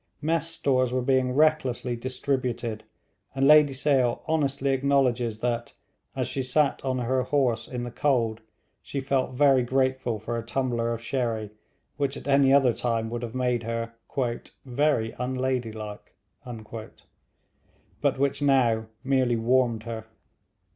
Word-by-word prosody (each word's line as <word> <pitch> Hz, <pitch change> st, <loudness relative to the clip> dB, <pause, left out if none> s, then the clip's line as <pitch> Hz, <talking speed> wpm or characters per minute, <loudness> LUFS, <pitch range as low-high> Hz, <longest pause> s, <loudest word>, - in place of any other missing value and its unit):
Mess 160 Hz, +1 st, 0 dB
stores 130 Hz, -6 st, +1 dB
were 130 Hz, 0 st, 0 dB
being 130 Hz, -1 st, +2 dB
recklessly 135 Hz, -4 st, +1 dB
distributed, 125 Hz, -3 st, -3 dB, 0.5 s
and 135 Hz, 0 st, +3 dB
Lady 150 Hz, -2 st, +7 dB
Sale 130 Hz, -3 st, +1 dB
honestly 140 Hz, -3 st, 0 dB
acknowledges 130 Hz, -5 st, +1 dB
that, 120 Hz, -1 st, -2 dB, 0.4 s
as -, -, -1 dB
she 135 Hz, -, -2 dB
sat 140 Hz, +3 st, +1 dB
on 130 Hz, -1 st, -1 dB
her 130 Hz, +1 st, 0 dB
horse 130 Hz, -3 st, 0 dB
in 125 Hz, -1 st, -5 dB
the 120 Hz, -, -5 dB
cold, 115 Hz, -5 st, 0 dB, 0.4 s
she 140 Hz, -, -5 dB
felt 135 Hz, -1 st, -1 dB
very 135 Hz, -1 st, +5 dB
grateful 130 Hz, -2 st, 0 dB
for 115 Hz, +3 st, -4 dB
a -, -, -6 dB
tumbler 120 Hz, -1 st, -1 dB
of 115 Hz, 0 st, -4 dB
sherry, 115 Hz, -4 st, -2 dB, 0.5 s
which 140 Hz, -1 st, -1 dB
at -, -, -10 dB
any 140 Hz, -1 st, +4 dB
other 135 Hz, -3 st, +5 dB
time 115 Hz, -2 st, -2 dB
would 120 Hz, 0 st, -3 dB
have 120 Hz, 0 st, -6 dB
made 125 Hz, -2 st, 0 dB
her 115 Hz, 0 st, -4 dB, 0.7 s
'very 125 Hz, -3 st, +1 dB
unladylike,' 125 Hz, -5 st, -3 dB, 1.9 s
but -, -, +1 dB
which 140 Hz, +1 st, 0 dB
now 120 Hz, -6 st, +3 dB, 0.2 s
merely 130 Hz, -3 st, +2 dB
warmed 115 Hz, -1 st, +1 dB
her. 115 Hz, -1 st, -6 dB
130 Hz, 135 wpm, -26 LUFS, 115-135 Hz, 1.9 s, Lady